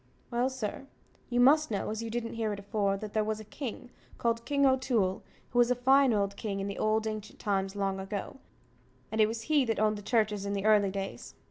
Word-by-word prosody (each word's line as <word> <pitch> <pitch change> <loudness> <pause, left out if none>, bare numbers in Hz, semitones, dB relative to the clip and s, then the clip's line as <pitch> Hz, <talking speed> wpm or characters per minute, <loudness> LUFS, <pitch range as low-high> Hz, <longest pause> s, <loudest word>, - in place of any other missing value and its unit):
Well, 240 +2 +1
sir, 260 +1 -5 0.4
you 245 0 +1
must 300 +5 +5
know, 210 -1 -2
as 220 +1 -3
you 230 - -4
didn't 230 0 -3
hear 225 -2 -1
it 200 - -6
afore, 200 -1 0
that 210 +1 -7
there 215 - +2
was 215 0 -2
a - - -8
king, 245 +2 -7 0.3
called 230 0 0
King 280 0 +2
O'Toole, 250 -8 +2 0.3
who 245 - +1
was 240 0 +5
a 250 - +3
fine 265 +2 +4
old 200 -2 0
king 200 -2 -3
in 195 - -2
the 200 - -5
old 215 +1 +1
ancient 215 -1 -5
times, 195 -2 -1
long 195 -1 -1
ago; 195 +5 -5 0.7
and 220 0 +1
it 215 - +6
was 225 +1 -4
he 295 +2 +3
that 225 -3 -1
owned 215 -1 +2
the - - -9
churches 210 -2 +1
in 200 0 -2
the 200 0 -2
early 210 -2 +5
days. 195 0 -6
215 Hz, 230 wpm, -30 LUFS, 200-240 Hz, 0.7 s, it